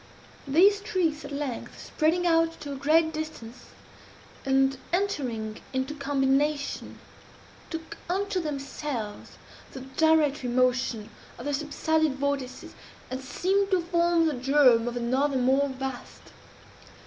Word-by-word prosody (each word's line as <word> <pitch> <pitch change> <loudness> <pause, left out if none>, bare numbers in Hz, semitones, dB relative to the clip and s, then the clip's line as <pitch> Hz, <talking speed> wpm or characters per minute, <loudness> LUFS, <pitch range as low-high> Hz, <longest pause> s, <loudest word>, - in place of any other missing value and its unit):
These 380 +9 +5
streaks, 360 -7 -1
at 285 - -8
length, 280 -4 -5
spreading 335 +3 0
out 330 -1 +2
to 290 - -6
a - - -4
great 315 +4 +3
distance, 310 -7 -7 0.8
and 270 0 +3 0.2
entering 255 - -2
into 260 +3 -1
combination, 280 0 0 0.7
took 325 -1 -7
unto 385 +1 0
themselves 275 -7 -5 0.4
the 265 - -7 0.2
gyratory 305 -5 +3
motion 250 -3 +1 0.3
of 240 - -9
the 290 - -1
subsided 310 +1 0
vortices, 275 -2 -3 0.4
and 260 +1 -3
seemed 390 +8 0
to 375 -3 +2
form 340 -1 +2
the 315 - +1
germ 255 -3 +4
of 240 0 -3
another 260 +4 +1
more 265 +3 +3
vast. 265 -1 -6
285 Hz, 120 wpm, -27 LUFS, 260-320 Hz, 0.8 s, These